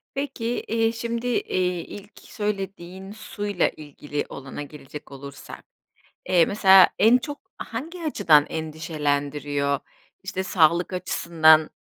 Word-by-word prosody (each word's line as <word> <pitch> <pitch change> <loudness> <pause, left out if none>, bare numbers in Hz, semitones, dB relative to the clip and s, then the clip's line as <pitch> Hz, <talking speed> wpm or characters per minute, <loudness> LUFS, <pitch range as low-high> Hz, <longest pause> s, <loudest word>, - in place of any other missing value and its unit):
Peki, 260 -4 -2
iii, 225 0 +1
şimdi, 235 +1 -3
iii, 180 -7 -1
ilk 205 +1 -11
söylediğin 195 -3 -5
suyla 205 -3 -2
ilgili 145 -1 -6
olana 135 +1 -8
gelecek 145 0 -10
olursak, 140 0 -10 0.6
eee, 175 -3 +5
mesela 190 -2 +6
en 225 +4 +6
çok 290 +3 -9
hangi 335 +6 -6
açıdan 155 - +4
endişelendiriyor? 145 -3 -2 0.4
İşte, 190 -1 -3
sağlık 175 -1 +2
açısından 160 -3 +3
180 Hz, 105 wpm, -24 LUFS, 150-215 Hz, 0.6 s, mesela